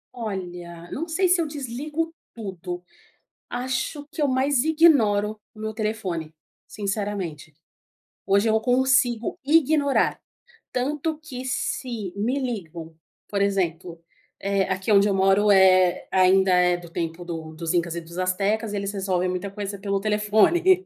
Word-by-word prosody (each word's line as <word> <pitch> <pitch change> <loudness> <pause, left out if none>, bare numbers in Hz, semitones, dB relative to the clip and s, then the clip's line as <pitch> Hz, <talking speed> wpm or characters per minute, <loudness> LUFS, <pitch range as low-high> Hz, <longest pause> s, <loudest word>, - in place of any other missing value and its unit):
Olha, 175 -6 -6
não 325 +4 -3
sei 370 +3 +1
se 360 -1 +3
eu 320 - -1
desligo 295 +4 -4 0.2
tudo. 180 -4 -6 0.7
Acho 260 +4 -3
que 320 - -5
eu 290 - +3
mais 260 0 +2
ignoro 225 -11 +3
o 215 - -16
meu 220 0 -3
telefone, 200 -8 -3 0.3
sinceramente. 200 -7 -4 0.7
Hoje 200 +3 +3
eu 220 - +3
consigo 245 -1 +2
ignorar, 295 -1 +3 0.5
tanto 295 +5 -1
que 270 -5 -8
se 240 -5 -3
me 230 +7 -1
ligam, 170 - -5 0.3
por 200 -1 0
exemplo, 175 -4 -1 0.4
eh, 200 0 +1
aqui 190 +3 -1
onde 200 0 +5
eu 200 - +1
moro 195 +2 +4
eh, 185 -2 +5
ainda 190 0 +4
é 180 0 +4
do 175 -1 -11
tempo 165 +1 -4
do 160 -2 -6
dos 165 +2 -3
incas 170 -1 0
e - - -2
dos 170 +1 -11
astecas, 200 +4 0
e - - -2
eles 200 0 -3
resolvem 190 -2 -1
muita 185 +2 -3
coisa 200 0 -5
pelo 200 -1 -1
telefone. 220 - +3
205 Hz, 145 wpm, -24 LUFS, 185-255 Hz, 0.7 s, onde